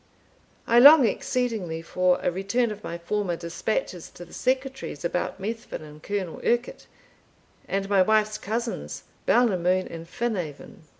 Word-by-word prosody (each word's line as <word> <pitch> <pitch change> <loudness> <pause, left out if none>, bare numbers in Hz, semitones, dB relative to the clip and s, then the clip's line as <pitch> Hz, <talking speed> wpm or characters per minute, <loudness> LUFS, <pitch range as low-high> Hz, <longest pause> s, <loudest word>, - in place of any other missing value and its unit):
"I 235 - +5
long 285 +1 +9
exceedingly 210 -7 -1
for 180 +2 +2
a - - +2
return 200 +6 0
of 210 0 -8
my 170 - -5
former 180 +1 -2
dispatches 175 +2 -3
to 175 - -9
the - - -17
Secretary's 260 - -2
about 180 +2 -2
Methven 220 -4 -5
and 150 0 -12
Colll 195 -3 -4
Urquhart, 240 +1 -1 0.8
and 195 0 -1
my 200 -1 +4
wife's 215 +2 +2
cousins, 230 +3 -4 0.2
Balnamoon 185 -6 +3
and 165 0 -8
Phinaven. 180 - -4
200 Hz, 135 wpm, -25 LUFS, 175-235 Hz, 0.8 s, long